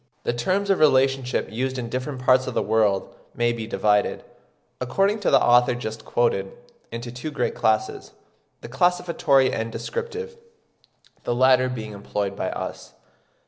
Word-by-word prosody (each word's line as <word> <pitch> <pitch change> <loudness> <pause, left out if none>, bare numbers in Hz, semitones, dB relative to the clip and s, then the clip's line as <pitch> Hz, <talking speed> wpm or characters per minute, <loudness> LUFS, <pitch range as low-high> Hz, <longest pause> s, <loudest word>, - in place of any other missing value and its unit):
The - - -1
terms 190 +12 0
of 195 - +2
relationship 135 -3 +2
used 130 +3 -2
in 120 -2 -4
different 130 +2 -4
parts 130 0 +3
of 130 - -4
the - - +1
world 105 -3 +1 0.2
may 120 0 +1
be 115 -2 -6
divided, 105 -2 +1 0.6
according 195 - +1
to 205 - 0
the 135 - +6
author 120 0 +4
just 110 -2 -6
quoted, 100 -5 0 0.4
into 120 +1 -6
two 125 +5 -6
great 140 -5 -2
classes, 110 0 -1 0.5
the - - -8
classificatory 160 -1 +2
and 115 0 -3
descriptive, 465 - -5 0.9
the 120 - -1
latter 130 0 +4
being 110 -4 -6
employed 100 -1 -3
by - - -2
us. - - -7
125 Hz, 150 wpm, -23 LUFS, 115-135 Hz, 0.9 s, the